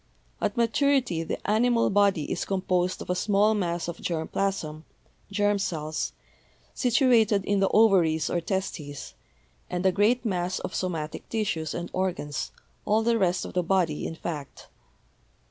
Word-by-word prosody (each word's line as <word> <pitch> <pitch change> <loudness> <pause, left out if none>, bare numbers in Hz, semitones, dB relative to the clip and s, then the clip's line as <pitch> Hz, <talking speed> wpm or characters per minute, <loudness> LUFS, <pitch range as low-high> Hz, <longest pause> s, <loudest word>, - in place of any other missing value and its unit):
At - - -1
maturity 235 - +2
the 165 - -3
animal 230 +2 +3
body 200 -5 +3
is - - -1
composed 185 -1 0
of - - -4
a - - +1
small 205 +3 +3
mass 175 -5 -1
of 170 -1 -6
germ 160 -2 -2
plasm 160 -6 -2 0.5
(germ 205 0 +2
cells), 155 -4 -2 0.6
situated 230 -6 +3
in 205 0 +1
the 195 - +3
ovaries 185 -8 +4
or 175 - -1
testes, 165 -6 -4 0.6
and 180 +1 -2
a 190 - +5
great 220 +6 +2
mass 185 -3 -1
of - - -5
somatic 165 -4 -4
tissues 190 -8 -2
and 175 0 -5
organs, 180 -6 -2 0.3
all 215 +2 +2
the 230 0 +2
rest 185 -2 +1
of - - -8
the 180 - +2
body, 175 -4 0
in 165 - -6
fact. 150 -4 -7
190 Hz, 150 wpm, -27 LUFS, 170-210 Hz, 0.6 s, a